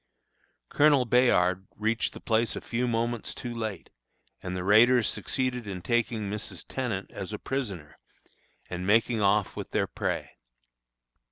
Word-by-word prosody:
Colonel 145 -3 +4
Bayard 95 -7 +3
reached 110 +2 0
the - - -9
place 115 0 +1
a - - -5
few 125 +2 -2
moments 120 0 -1
too 120 -1 -5
late, 110 -6 -5 0.5
and 90 0 -4
the 90 - -3
raiders 115 +4 +5
succeeded 125 -4 -2
in 90 -3 -6
taking 115 -3 0
Mrs. 105 +1 -4
Tenant 115 -7 -3
as 95 +2 -6
a - - -2
prisoner, 100 - -5 0.7
and 90 +1 -5
making 115 +1 +3
off 100 0 +2
with - - -6
their - - +1
prey. - - -3
110 Hz, 145 wpm, -28 LUFS, 100-120 Hz, 0.7 s, raiders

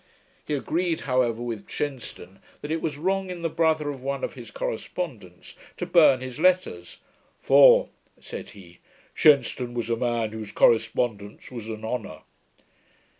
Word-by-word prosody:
He 150 - -2
agreed, 165 +4 -1
however, 125 -3 0
with 115 -4 -6
Shenstone, 120 -9 -6 0.2
that 145 - -6
it 160 0 -1
was 150 -3 -3
wrong 190 +4 -1
in 175 -2 -6
the 165 - -1
brother 160 -3 +1
of 135 -3 -9
one 135 0 -3
of - - -3
his - - -10
correspondents - - -6 0.2
to - - -3
burn 150 -7 +5
his 130 +2 -7
letters; 180 - +1 0.4
'for,' 140 +1 +6 0.3
said - - -8
he, 85 -3 -15 0.3
'Shenstone 125 -4 +3
was 120 -1 -2
a - - +2
man 115 -2 -1
whose 110 -2 -7
correspondence 110 -2 +1
was 115 -3 -7
an 110 0 -6
honour.' 110 -8 -5
130 Hz, 150 wpm, -25 LUFS, 115-155 Hz, 0.4 s, for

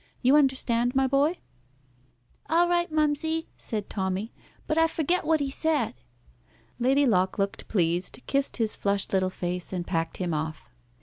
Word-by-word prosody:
You 260 +3 +5
understand, 260 -4 +2
my 270 0 +3
boy?" 280 +6 +2 1.1
"All 340 +2 +4
right, 345 -1 +1
mumsy," 310 +1 0
said 210 -3 -4
Tommy. 190 +2 -3 0.3
"But 315 +1 +1
I 325 - +5
forget 330 +2 0
what 315 -1 +2
he 275 -1 -1
said." 315 - 0 0.9
Lady 270 +4 +3
Locke 190 -5 +2
looked 200 -1 -2
pleased, 175 -1 0
kissed 275 0 0
his 225 -3 +1
flushed 200 -1 -1
little 185 -1 +2
face, 180 -1 -4
and 180 -2 -3
packed 165 -2 -2
him 175 -3 -2
off. 155 -2 -4
245 Hz, 150 wpm, -27 LUFS, 185-305 Hz, 1.1 s, You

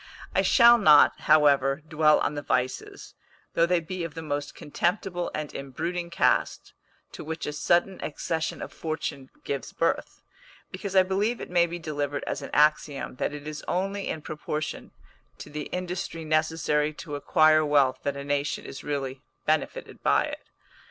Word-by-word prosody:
I - - +3
shall 235 -1 +6
not, 150 -8 +6
however, 145 -2 +4
dwell 155 -1 +4
on - - 0
the 145 - -4
vices, 130 -2 -3 0.4
though 170 - +3
they 180 0 +3
be 175 +2 -5
of 165 -3 -6
the 160 - -6
most 145 -1 -4
contemptible 175 +3 -2
and 150 -1 -4
embruting 170 +6 -4
cast, 170 - +1 0.4
to - - -8
which 160 +1 -5
a 150 - -3
sudden 175 +5 +1
accession 160 +1 -3
of - - -9
fortune 155 -4 -4
gives 140 -4 -4
birth, - - -2 0.5
because 195 +1 -5
I 190 - +7
believe 205 +5 0
it - - -8
may 175 -1 +4
be 170 +1 -5
delivered 145 -3 -3
as 140 - -3
an 140 - -7
axiom, 150 -3 +1
that - - -1
it 145 0 -8
is 155 -1 -6
only 195 +2 -2
in 155 - -4
proportion 155 0 -4 0.5
to - - -10
the 150 0 -4
industry 180 -2 -4
necessary 155 -1 +1
to 150 - -8
acquire 155 +1 +4
wealth 145 -3 +3
that 140 -1 -2
a 140 - -5
nation 145 0 -2
is 135 - -8
really 135 -2 -3 0.2
benefited 155 -1 -2
by - - +3
it. - - -7
155 Hz, 165 wpm, -26 LUFS, 145-170 Hz, 0.5 s, I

